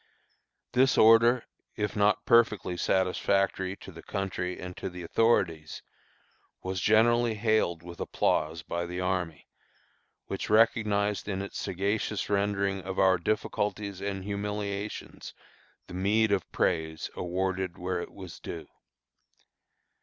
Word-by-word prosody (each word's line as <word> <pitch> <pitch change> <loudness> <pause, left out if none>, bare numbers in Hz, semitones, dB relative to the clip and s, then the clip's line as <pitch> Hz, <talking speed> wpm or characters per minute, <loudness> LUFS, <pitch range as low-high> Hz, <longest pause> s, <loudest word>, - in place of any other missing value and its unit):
This 130 +2 +3
order, 115 +2 +6 0.3
if 105 -1 -2
not 105 0 +2
perfectly 115 -6 +3
satisfactory 95 +1 +1
to 95 - -12
the 85 -1 -11
country 95 -2 -3
and 90 0 -7
to - - -4
the 90 0 -8
authorities, 85 -6 +1 0.8
was 95 0 -3
generally 115 +2 +4
hailed 105 -6 +1
with 85 0 -10
applause 80 +1 0
by 85 +1 -3
the 90 +1 -5
army, 90 -4 -2 0.8
which - - -4
recognized 105 -2 +2
in 95 -1 -2
its 100 - -6
sagacious 100 +2 -2
rendering 100 -1 0
of 95 +1 -6
our 95 -1 +4
difficulties 105 0 -2
and 100 -1 -3
humiliations 100 0 -4 0.5
the - - -12
meed 105 +4 +2
of 100 -4 0
praise 80 -2 -1
awarded 95 0 -2
where 90 0 -2
it - - -8
was 95 -4 -10
due. - - -7
95 Hz, 125 wpm, -28 LUFS, 90-105 Hz, 0.8 s, order